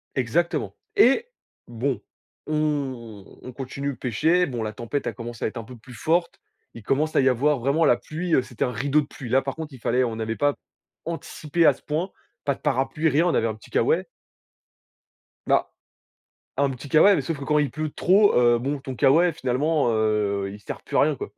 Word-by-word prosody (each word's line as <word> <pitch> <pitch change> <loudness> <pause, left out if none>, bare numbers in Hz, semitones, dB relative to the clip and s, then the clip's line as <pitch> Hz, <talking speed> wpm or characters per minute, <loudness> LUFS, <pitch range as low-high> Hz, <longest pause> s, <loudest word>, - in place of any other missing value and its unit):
Exactement. 150 +7 0 0.2
Et! 405 - +5 0.4
Bon, 120 +3 -2 0.5
on 135 -9 -2 0.2
on 125 - -8
continue 140 +2 -4
de - - -14
pêcher. 160 - +2
Bon, 120 -6 -4
la 110 0 -4
tempête 120 +6 -4
a - - -2
commencé 120 -1 -6
à - - +2
être 110 - -7
un 115 - -5
peu 125 +2 -12
plus 125 +3 -14
forte. 170 +7 0 0.3
Il 115 - -11
commence 150 +7 0
à - - +5
y 130 - +4
avoir 135 +3 +2
vraiment 140 +6 +2
la 120 - +5
pluie, 165 +6 -4
heu, - - +4
c'était 125 -2 -3
un 125 - -2
rideau 140 +6 +1
de - - -6
pluie. 135 -3 -9
Là, 130 +3 +3
par 135 0 -4
contre, 160 -3 -7
il 130 - -11
fallait 125 +3 +1
on 115 -2 -2
n'avait 110 0 -3
pas 145 0 +1 0.5
anticipé 165 -1 -1
à 150 - +7
ce - - -19
point, 160 +6 -2 0.3
pas 140 -2 0
de - - -21
parapluie, 135 +3 0
rien, 155 +4 +2
on - - +1
avait 115 - +2
un 110 - -3
petit 110 - -17
K-way. 170 +10 +2 1.4
Bah, - - +2 0.9
un 140 - +3
petit 135 +2 -8
K-way, 180 +8 +6
mais - - -1
sauf 165 -4 -3
que 140 - -6
quand 150 +1 +2
il 145 -2 +1
pleut 155 0 -4
trop, 200 +7 +4
heu, 120 -1 +4
bon, 140 +4 -2
ton 130 -1 -7
K-way, 165 +8 +4
finalement, 145 0 0
heu, 105 -3 0
il 105 - -11
sert 100 - -7
plus - - -4
à - - +5
rien, - - +2
quoi - - -6
135 Hz, 215 wpm, -24 LUFS, 120-155 Hz, 1.4 s, à